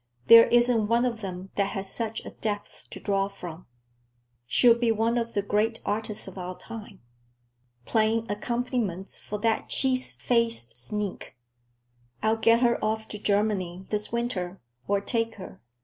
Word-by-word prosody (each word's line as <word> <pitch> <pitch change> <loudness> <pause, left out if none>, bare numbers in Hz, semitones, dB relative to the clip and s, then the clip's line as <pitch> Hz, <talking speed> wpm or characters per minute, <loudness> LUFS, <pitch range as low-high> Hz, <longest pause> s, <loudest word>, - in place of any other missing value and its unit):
There 230 0 +9
isn't 240 -2 +4
one 235 +2 +3
of 230 -3 -2
them 190 -1 -6
that 200 -1 +1
has 195 0 -3
such 225 -1 -3
a - - -7
depth 205 -2 -5
to - - -8
draw 195 -1 0
from. 180 -4 -9 0.8
She'll 240 - +6
be 235 0 +1
one 225 +2 +1
of 230 -1 -2
the 200 - +1
great 215 +3 0
artists 215 -1 -2
of 190 0 -8
our 180 0 -6
time. 225 -3 -10 0.8
Playing 225 0 +2
accompaniments 220 -3 -2
for 210 - -5
that 225 0 0
cheese 260 -1 +1
faced 230 - +1
sneak! 200 - -4 0.9
I'll 220 +1 +2
get 230 +1 +4
her 240 -1 +2
off 220 0 -1
to 210 - -6
Germany 200 -3 0
this 210 0 -2
winter, 195 -6 -2 0.3
or 200 0 +1
take 225 +2 -1
her. 185 - -11
215 Hz, 155 wpm, -27 LUFS, 195-230 Hz, 0.9 s, There